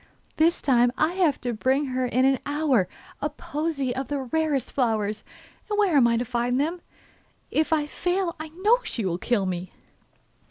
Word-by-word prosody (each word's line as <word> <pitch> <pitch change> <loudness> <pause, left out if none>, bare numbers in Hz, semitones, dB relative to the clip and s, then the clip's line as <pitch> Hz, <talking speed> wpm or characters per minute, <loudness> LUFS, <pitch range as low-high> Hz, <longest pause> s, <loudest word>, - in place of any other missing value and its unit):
'This 330 +2 +3
time 245 -3 +4
I 315 +3 +2
have 350 -7 +2
to 245 -1 -2
bring 260 +6 +1
her 255 0 0
in 255 +2 +2
an 270 -1 +3
hour 290 - +1 0.3
a - - 0
posy 290 -5 -3
of 265 0 -3
the 290 - -2
rarest 280 0 -1
flowers, 215 -5 0 0.5
and 415 - -1
where 400 -6 +3
am 255 -4 +6
I 235 0 +2
to 245 - -1
find 245 +1 0
them? 330 +5 -1 0.7
If 315 +1 +1
I 305 -2 +2
fail 355 +3 -1
I 315 0 -6
know 410 +9 +3
she 225 - -3
will 175 -1 -1
kill 220 -3 +1
me. 185 0 -4
270 Hz, 185 wpm, -25 LUFS, 240-315 Hz, 0.7 s, am